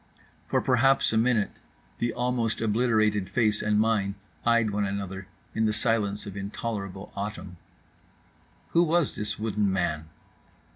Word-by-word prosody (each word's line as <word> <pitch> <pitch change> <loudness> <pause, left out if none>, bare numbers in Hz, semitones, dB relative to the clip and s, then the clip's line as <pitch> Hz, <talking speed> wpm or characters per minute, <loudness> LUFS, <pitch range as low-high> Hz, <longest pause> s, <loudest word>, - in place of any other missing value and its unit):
For - - +1
perhaps 130 -1 +3
a - - +1
minute 115 -2 +1 0.4
the 120 0 0
almost 120 -2 0
obliterated 110 -3 +2
face 110 -4 +2
and 105 0 +2
mine 105 -3 +1 0.3
eyed 115 -2 +3
one 105 0 0
another 100 -1 -4 0.3
in 110 - +1
the 105 - +2
silence 105 -3 0
of 100 -2 -7
intolerable 100 -1 -5
autumn. 100 -3 -5 1.1
Who 170 - +4
was 170 -2 +2
this 105 - -3
wooden 105 -2 0
man? 80 -4 -1
105 Hz, 135 wpm, -27 LUFS, 100-115 Hz, 1.1 s, Who